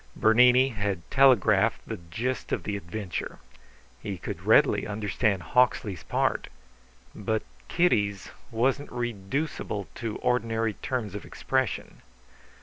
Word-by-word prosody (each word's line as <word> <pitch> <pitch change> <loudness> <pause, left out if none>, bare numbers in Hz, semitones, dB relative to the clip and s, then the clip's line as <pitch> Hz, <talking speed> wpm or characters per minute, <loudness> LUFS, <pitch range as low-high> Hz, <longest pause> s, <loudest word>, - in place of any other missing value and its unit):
Bernini 125 +4 +5
had 100 -6 -3
telegraphed 130 -7 +4
the - - -4
gist 110 +10 -4
of - - -1
the 105 - -3
adventure. 95 -1 -5 0.6
He 100 -3 -4
could - - -7
readily - - +4
understand 105 -2 -1
Hawksley's 110 -7 +1
part; - - 0 0.7
but 110 +1 -2 0.2
Kitty's 105 - +1 0.2
wasn't 130 +5 0
reducible 120 - -3
to 115 -4 -4
ordinary 115 -2 0
terms 115 -3 -4
of 105 - -6
expression. 130 -2 -2
110 Hz, 110 wpm, -27 LUFS, 100-125 Hz, 0.7 s, Bernini